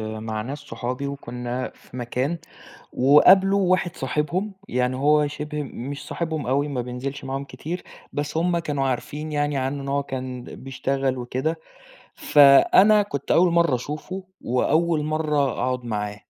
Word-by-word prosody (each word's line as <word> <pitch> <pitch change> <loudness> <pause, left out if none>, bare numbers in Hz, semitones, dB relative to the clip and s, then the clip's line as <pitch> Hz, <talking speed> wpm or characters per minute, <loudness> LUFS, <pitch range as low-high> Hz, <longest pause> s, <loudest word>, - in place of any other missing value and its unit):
مع 110 0 -4
ناس 140 +6 -5
صحابي 125 0 -5
وكُنّا 125 -2 -4
في 125 - -14
مكان 130 +7 -2 0.5
وقابلوا 185 +8 +5
واحد 180 -2 0
صاحبهم. 160 +9 -2
يعني 125 +1 0
هو 150 +2 +3
شِبه 150 0 -4
مش 140 +1 -7
صاحبهم 160 -5 -3
أوي 140 +3 +1
ما 130 -4 -2
بينزلش 130 +3 -5
معاهم 135 +1 -3
كتير، 155 +7 -6 0.3
بس 145 +2 -3
هم 170 +1 +2
كانوا 145 -4 -1
عارفين 150 +4 -4
يعني 145 -1 0
عنّه 135 +2 -2
إن 135 - -6
هو 140 0 +1
كان 130 -2 -5
بيشتغل 135 0 -2
وكده. 130 +6 -2 0.6
فأنا 150 +9 +6
كنت 145 -9 -4
أول 175 +1 +5
مرّة 170 -5 +3
أشوفه 155 +9 -5 0.2
وأول 155 +6 +1
مرّة 155 0 -1
أقعد 125 +1 -2
معاه. 105 -2 -3
140 Hz, 145 wpm, -24 LUFS, 125-155 Hz, 0.6 s, فأنا